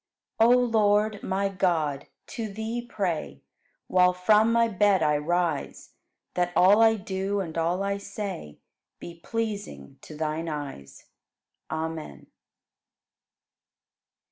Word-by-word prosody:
5. 225 - +6
O 250 - +6
Lord, 215 -3 +2
my 195 +1 -1
God, 165 -7 -1 0.2
to 220 -3 -6
Thee 220 +3 -4
pray 175 - -4 0.4
While 180 0 +4
from 210 +5 +3
my 230 0 +3
bed 200 -3 +2
I 150 -1 +3
rise 165 -1 -2 0.4
That 175 0 0
all 200 +4 +6
I 225 0 +6
do 195 0 -3
and 170 -5 -5
all 170 +3 0
I 200 0 -1
say 200 - -6 0.4
Be 170 -1 -10
pleasing 210 - -5
to 155 - -11
Thine 160 +1 -2
eyes. 135 - -7 0.6
Amen. 160 - -5
190 Hz, 115 wpm, -26 LUFS, 160-210 Hz, 0.6 s, 5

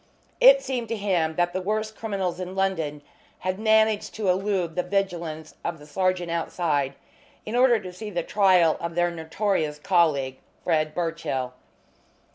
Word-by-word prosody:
It - - +8
seemed 245 -3 -3
to 230 - -2
him 175 -6 0
that 175 +1 +1
the 185 - -2
worst 215 +3 -2
criminals 190 -5 -3
in 185 +1 -5
London 165 -7 -1 0.3
had 185 +2 -3
managed 220 -1 +2
to 210 -3 -1
elude 185 -3 0
the 180 - +2
vigilance 175 -5 -3
of 170 -1 -3
the 150 - -14
sergeant 180 +2 0
outside 155 -5 -1 0.5
in 215 - -4
order 245 -2 +5
to 185 -3 -8
see 210 +4 -7
the 175 -4 -2
trial 185 -6 +4
of 170 0 -4
their 175 0 +2
notorious 160 -1 -1
colleague, 150 -6 +1 0.2
Fred 155 -2 +1
Birchill. 160 -7 -2
180 Hz, 155 wpm, -25 LUFS, 160-205 Hz, 0.5 s, It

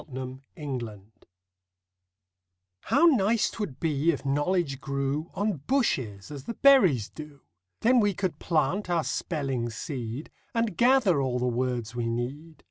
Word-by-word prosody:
EASY 130 -1 -5 0.2
KNOWLEDGE 120 - -6 1.7
How 340 - +4
nice 230 - +3
'twould 200 - -5
be 155 -1 +1
if 140 - -6
knowledge 145 0 0
grew 140 +3 -2
On 205 -3 0
bushes, 125 - 0
as 140 -2 -8
the 230 - -5
berries 190 - +5
do! 150 -2 -11 0.4
Then 250 +2 +5
we 205 -3 +2
could 180 -6 -2
plant 170 +5 0
our 170 -2 +1
spelling 135 -4 -2
seed, 120 +2 -5 0.2
And 230 -5 0
gather 235 - +4
all 130 -2 0
the 125 - -1
words 125 -2 -1
we 120 -1 -1
need. 135 +8 -4
145 Hz, 135 wpm, -27 LUFS, 125-190 Hz, 1.7 s, berries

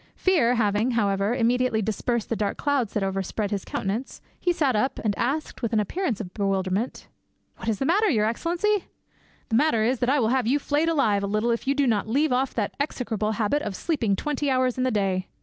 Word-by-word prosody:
Fear 285 -11 +3
having, 215 +1 +1
however, 200 +1 +1
immediately 250 -1 +2
dispersed 220 +2 -1
the 230 - 0
dark 205 -2 -2
clouds 275 -7 0
that 210 - 0
overspread 195 +2 -2
his 200 -2 -2
countenance, 210 +7 -4 0.2
he 355 - +1
sat 285 -7 +1
up, 215 +6 0
and 210 -3 0
asked 280 +8 -2
with 230 -2 -2
an 220 - +3
appearance 245 - -1
of 185 -5 -7
bewilderment— 195 +2 -1 0.5
"What - - -4
is 215 - 0
the 270 - -1
matter, 405 +8 +3
your 215 -7 +2
excellency?" 345 - 0 0.6
"The 225 - +1
matter 235 -4 +3
is 245 +2 +1
that 245 - +1
I 285 +2 +3
will 225 -3 +2
have 255 -2 +1
you 270 +4 +3
flayed 295 +3 0
alive 225 -11 +2
a 200 - -2
little 215 +4 +1
if 235 +2 -2
you 275 - +2
do 285 -1 +2
not 220 -4 +1
leave 285 +6 +2
off 260 +1 0
that 210 -3 -1
execrable 225 -6 -1
habit 225 +7 0
of 205 -6 -4
sleeping 230 - 0
twenty 290 +5 -2
hours 255 -1 +2
in 255 - 0
the - - +2
day." 190 -4 0
235 Hz, 220 wpm, -25 LUFS, 210-275 Hz, 0.6 s, Fear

